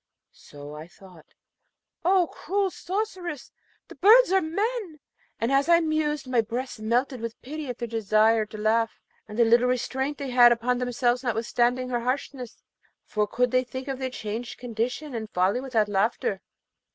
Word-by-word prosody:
So 145 0 -12
I 155 +2 -9
thought, 180 -3 -17 0.8
'Oh, 365 +1 +4
cruel 390 +2 -1
sorceress! 365 - -4 0.4
the - - -11
birds 460 +2 +6
are 385 0 +4
men!' 400 0 -2 0.4
And 230 +3 0
as 275 +4 +2
I 340 0 +7
mused, 310 -3 -1
my 250 -2 +3
breast 240 +2 -5
melted 240 +3 0
with 230 0 -6
pity 300 +3 -6
at 245 - -4
their 235 - -4
desire 220 0 +2
to 215 - -9
laugh, 225 +1 +1 0.3
and 210 0 -8
the 235 - +5
little 235 +2 +4
restraint 265 +3 -1
they 275 -2 -5
had 245 -1 +7
upon 240 +1 +1
themselves 245 0 0
notwithstanding 240 +1 0
her 240 -1 0
harshness; 255 0 -4 0.4
for 210 -1 -1
could 245 +3 0
they 255 0 +3
think 260 +1 -7
of 270 -1 -4
their 260 -1 -2
changed 230 0 -5
condition 245 +5 -3
and 220 -2 -5
folly 185 +7 +1
without 235 -6 +1
laughter? 205 -1 0
245 Hz, 165 wpm, -26 LUFS, 225-285 Hz, 0.8 s, I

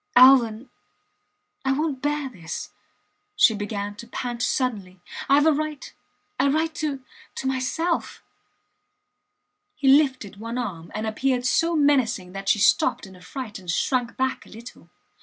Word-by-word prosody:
Alvan... 250 -2 +6 1.0
I 265 0 +2
wont 290 -2 -2
bear 295 -1 -1
this... 180 -10 -7 0.6
She 225 - +5
began 205 -1 -4
to 235 - -10
pant 240 0 -5
suddenly, 205 -9 -1 0.3
Ive 285 +2 +5
a 320 - +6
right 305 -1 -4 0.5
a 275 +1 +3
right 315 +3 0
to 290 -4 -3 0.3
to - - -5
myself... 265 +6 -2 1.5
He 275 - -2
lifted 265 -8 +3
one 230 +3 -5
arm, 180 -9 -5
and 215 +1 -2
appeared 245 +3 0
so 330 +6 +2
menacing 260 - +2
that 195 +1 -4
she - - +4
stopped 210 - +3
in 190 -1 -13
a 180 - -16
fright 220 0 -7
and 180 -2 -12
shrank 245 +7 0
back 265 0 -2
a - - -16
little. 230 +3 -12
255 Hz, 145 wpm, -24 LUFS, 210-280 Hz, 1.5 s, Alvan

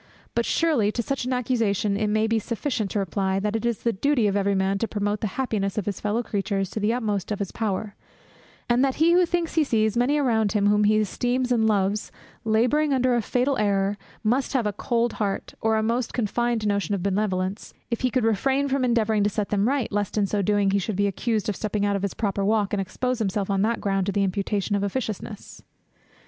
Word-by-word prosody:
But 235 - 0
surely 295 -11 +2
to 235 - -1
such 275 +1 -2
an 255 - -1
accusation 225 -5 0
it 210 +1 0
may 215 +1 +2
be 225 0 +1
sufficient 230 -1 -2
to - - -3
reply, 195 0 0
that 210 +2 -1
it 225 +1 0
is 235 -3 -2
the 235 - +1
duty 260 +3 +1
of 200 -1 +1
every 200 0 +1
man 190 +1 +1
to 230 - 0
promote 205 0 -2
the 215 - 0
happiness 215 -7 -1
of 210 - -1
his 200 -2 -3
fellow 215 +3 -1
creatures 195 -3 -2
to - - -3
the 210 +1 +1
utmost 215 -5 -2
of 210 - -1
his 200 -2 -4
power; 210 -1 -2 0.7
and 240 +2 +3
that 270 -1 +1
he 325 +2 +4
who 355 0 +4
thinks 345 -1 -1
he 320 - +3
sees 220 -5 +1
many 250 +5 +2
around 225 -7 +1
him, 205 -2 +2
whom 210 0 +4
he 215 +1 +4
esteems 245 +4 0
and 225 -2 +3
loves, 205 0 0 0.3
labouring 250 +7 +2
under 255 -1 +2
a 240 - +2
fatal 255 +4 0
error, 200 -1 +1 0.3
must 245 +5 +1
have 255 -5 +1
a 210 - 0
cold 235 +2 0
heart, 200 -2 -2
or 220 0 +2
a 220 - +1
most 235 +2 -1
confined 235 0 0
notion 205 0 0
of 185 - -4
benevolence, 195 0 -1 0.2
if 235 - -1
he 255 - +2
could 250 -2 0
refrain 265 +6 +1
from 270 -1 0
endeavouring 225 -4 +2
to 205 - +2
set 210 0 -2
them 205 +1 +1
right, 270 -2 0
lest 205 0 -2
in 205 - +3
so 205 +1 -1
doing 205 0 +2
he 200 - +2
should 200 +2 -3
be 205 +2 +1
accused 215 +2 -1
of 210 - -1
stepping 210 0 -1
out 200 0 +1
of 200 - -2
his 200 -1 -3
proper 200 -2 -1
walk, 210 0 +1
and 200 - +1
expose 250 +6 -2
himself 200 -1 -1
on 195 -1 +1
that 225 +2 +1
ground 195 -1 0
to - - +1
the 200 0 +1
imputation 200 +1 -1
of 200 - 0
officiousness. 210 0 -5
215 Hz, 235 wpm, -24 LUFS, 200-240 Hz, 0.7 s, he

